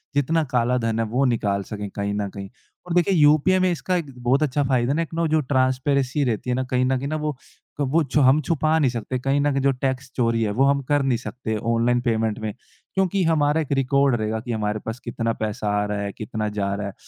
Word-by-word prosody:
जितना 155 +3 +2
काला 125 +1 +2
धन 115 0 0
है 115 - +1
वो 135 +2 +3
निकाल 105 -5 0
सकें 105 0 -6
कहीं 100 0 -3
न 100 0 -2
कहीं। 100 0 -8 0.4
और 175 - -3
देखिए 175 +2 +3
यूपीआई 155 +4 +4
में 185 0 +2
इसका 180 +2 -1
एक 155 -6 -3
बहुत 135 +5 +3
अच्छा 145 0 0
फ़ायदा 130 -1 +1
है 160 - 0
एक 165 - -11
ना 165 +1 0
जो 155 0 +2
ट्रांसपेरेंसी 130 +1 +1
रहती 120 -1 -2
है 125 - +1
ना 130 - -1
कहीं 125 0 +2
न 130 +1 +1
कहीं 135 +2 -4
ना 155 - -2
वो। 150 - -2 0.5
क 140 - +1
वो 165 +3 +4
जो 150 - +3
हम 135 +2 +5
छुपा 155 0 +1
नहीं 140 -4 +3
सकते 120 +2 -3
कहीं 135 +2 +1
न 145 0 +2
कहीं 135 0 0
जो 140 +1 +3
टैक्स 135 0 -2
चोरी 115 -2 +1
है 105 - 0
वो - - +6
हम 140 0 +2
कर 145 -1 +3
नहीं 130 -3 +1
सकते 110 +1 -5 0.2
ऑनलाइन 120 +1 +2
पेमेंट 115 -3 0
में। 110 -1 -4 0.4
क्योंकि 190 0 +1
हमारा 160 -1 +2
एक 150 - -6
रिकॉर्ड 140 0 +2
रहेगा 110 0 -2
कि 120 +2 -6
हमारे 105 -1 -1
पास 115 +2 -5
कितना 115 -1 -2
पैसा 105 -1 -2
आ - - 0
रहा 105 0 -3
है, 100 0 -3
कितना 110 0 -3
जा 100 -1 -2
रहा 100 0 -4
है। 100 - -7
130 Hz, 250 wpm, -23 LUFS, 110-145 Hz, 0.5 s, वो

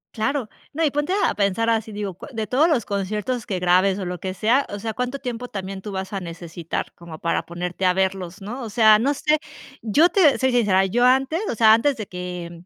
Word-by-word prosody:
Claro, 245 +1 -1 0.2
no, 325 +3 -1
y 300 - +2
ponte 295 +5 -1
a 405 - +2
a - - -3
pensar 205 +3 +1
así, 225 -1 -1
digo 205 -3 -4
co - - -11
de 220 -2 -2
todos 265 +9 +3
los 280 -10 +1
conciertos 210 +4 -3
que 190 -3 -3
grabes 185 +2 +3
o 200 - -4
lo 180 -1 -5
que 190 -1 -4
sea, 230 +8 +2
o 205 - -5
sea, 220 +2 -4
¿cuánto 250 +4 -3
tiempo 245 -2 -5
también 195 -3 -6
tú 205 0 -7
vas 190 +1 -4
a 200 - -3
necesitar 170 -1 -6
como 170 -2 -10
para 170 - -1
ponerte 180 +2 -4
a 180 - +4
verlos?, 190 0 -2
¿no? 235 +7 -6
O 225 - -5
sea, 215 0 +5
no 275 +6 +1
sé, 300 +2 +1 0.4
yo 290 - +4
te 335 -9 +4
soy 260 0 +1
sincera, 205 -6 +3
yo 240 +6 +2
antes, 265 +5 +3
o - - -2
sea, 220 0 +6
antes 270 +5 +2
de 215 -4 -6
que 180 -1 -6
em, 170 0 -13
210 Hz, 240 wpm, -22 LUFS, 185-250 Hz, 0.4 s, sea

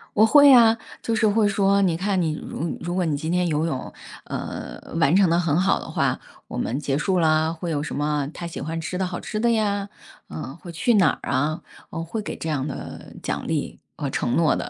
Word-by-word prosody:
我 215 - +6
会 285 +4 +7
啊， 230 -3 +7 0.2
就 230 - -1
是 225 0 +2
会 215 0 +3
说， 200 0 +3
你 180 -4 +2
看 190 +2 0
你， 160 -2 0
呃， - - -8
如 165 +1 -4
如 175 +1 -3
果 185 -1 +1
你 155 -3 0
今 155 +3 -3
天 180 0 +2
游 155 -1 0
泳， 150 -6 -4 0.3
呃， - - -6 0.2
完 160 0 +4
成 195 -2 +5
得 170 +1 +3
很 160 -3 +1
好 190 +2 +2
的 - - -8
话， - - 0 0.3
我 - - -6
们 125 - -1
结 140 -2 0
束 185 +5 +1
了， 160 0 +2
会 170 +1 -4
有 145 -2 -1
什 155 - -5
么 145 -1 0
她 175 - -7
喜 170 - -6
欢 165 +3 -4
吃 180 +3 -4
的 190 - 0
好 180 -1 -5
吃 215 - -4
的 235 +1 +3
呀， 205 -3 0 0.4
嗯， 145 -1 -7
会 175 - -11
去 220 +8 +2
哪 180 -9 +4
儿 - - -4
啊， 145 +4 0 0.3
我 165 -1 -4
会 215 +7 -4
给 210 - -5
这 160 - -4
样 145 -2 -1
的 - - -8
奖 - - -3
励 - - -2 0.2
和 140 - -2
承 120 -2 -1
诺 165 -2 +3
的。 - - -3
170 Hz, 255 characters per minute, -23 LUFS, 155-200 Hz, 0.4 s, 会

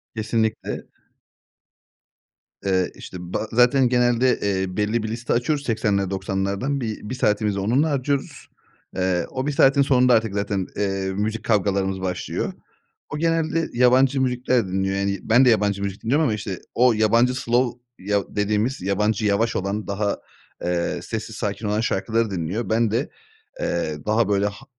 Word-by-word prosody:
Kesinlikle. 110 0 -2 1.8
Eee, 95 -2 +1
işte - - -9 0.2
ba 110 - -1
zaten 125 +2 +4
genelde, 125 0 +3
eee, 95 -2 -1
belli 105 +2 0
bir - - -2
liste 120 +2 -2
açıyoruz 140 +4 0
80'ler, 105 -5 0
90'lardan 100 +7 -2
bi 110 -2 -3
1 105 +5 -5
saatimizi 105 -4 +1
onunla 125 +11 +2
harcıyoruz. 140 -1 -2 0.5
Eee, 90 -2 0
o 130 +1 -3
1 - - +1
saatin 140 0 +4
sonunda 125 -2 +4
artık 115 -3 +2
zaten, 100 -2 -1
eee, 95 -1 -1
müzik 110 +2 -2
kavgalarımız 95 -3 +1
başlıyor. 90 -1 -3 0.6
O 145 - -4
genelde 165 0 0
yabancı 130 +2 +4
müzikler 125 -3 +1
dinliyor, 95 +1 -1
yani, 100 0 -1
ben 120 +4 +5
de - - +6
yabancı 100 -3 +2
müzik 100 0 -5
dinliyorum 140 +8 +2
ama 125 -8 +1
işte 100 -3 -5 0.2
o 125 0 +5
yabancı 115 +4 +3
slow 120 -1 0 0.2
yav 100 +1 0
dediğimiz 105 +5 -1
yabancı 105 +2 0
yavaş 105 +3 +1
olan, 100 +2 -2
daha, 100 0 -1 0.5
eee, 85 -1 -1
sessiz - - -5
sakin 110 - -3
olan 105 +2 0
şarkıları 115 0 0
dinliyor. 95 +6 -3
Ben 115 -1 +2
de, 120 +6 -1 0.5
eee, 80 -3 -1
daha 110 0 +2
böyle 100 0 +2
ha 105 +6 -8
110 Hz, 155 wpm, -23 LUFS, 100-125 Hz, 1.8 s, de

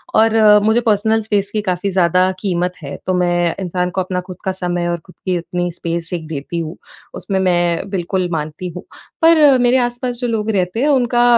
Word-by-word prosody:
और 225 0 +4 0.3
मुझे 225 +2 +3
personal 220 0 +2
space 205 -2 -1
की 215 - -1
काफ़ी 185 0 -1
ज़्यादा 185 +1 +3
क़ीमत 180 -2 -1
है, - - -6
तो 185 - +1
मैं 175 -1 +1
इंसान 180 -1 -1
को 185 - -1
अपना 180 0 -2
ख़ुद 180 -1 -8
का 190 - +1
समय 175 -2 -2
और 170 0 -1
ख़ुद 180 - -17
की 185 -1 0
इतनी 175 +1 -3
स्पेस 170 0 -4
एक 160 -3 -4
देती 160 +2 -4
हूँ, 160 0 -5 0.4
उसमें 195 -2 -2
मैं 175 0 +1
बिल्कुल 185 -1 -2
मानती 155 +3 -4
हूँ। 180 - -7 0.4
पर 305 -5 +6
मेरे 245 +1 +4
आस-पास 245 0 -2
जो 245 - 0
लोग 220 -1 -1
रहते 185 +2 -1
हैं 295 - +2
उनका 245 -3 +2
185 Hz, 200 wpm, -18 LUFS, 175-220 Hz, 0.4 s, पर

